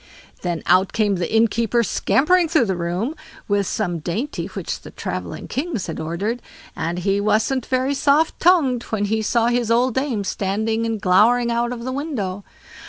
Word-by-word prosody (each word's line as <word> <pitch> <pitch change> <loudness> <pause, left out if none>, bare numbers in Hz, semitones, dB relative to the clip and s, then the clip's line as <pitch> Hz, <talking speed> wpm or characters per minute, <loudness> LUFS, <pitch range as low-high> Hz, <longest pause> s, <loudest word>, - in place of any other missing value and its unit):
Then 175 -3 -3
out 185 +1 +3
came 205 -3 +1
the 175 -1 -3
innkeeper, 230 +1 +2
scampering 340 - +2
through 315 -7 +3
the 190 -3 -1
room, 175 - -2 0.3
with 200 -2 +1
some 175 -6 -2
dainty 210 - -3
which - - -5
the - - -10
travelling - - -5
kings 275 - -3
had 165 - -5
ordered, 190 +10 -3 0.3
and 170 +2 -2
he 195 +2 0
wasn't 215 +5 +1
very 260 +2 +1
soft 295 +3 +2
tongued 305 -9 +4
when 210 -2 -1
he 220 +2 0
saw 230 +2 +2
his 240 -2 0
old 240 +2 +3
dame 260 -5 -1
standing 220 +4 -1
and 225 -1 -2
glowering 230 +6 +4
out 235 +1 0
of 235 -1 -5
the 260 - -3
window. 235 - -3
225 Hz, 170 wpm, -21 LUFS, 195-255 Hz, 0.3 s, tongued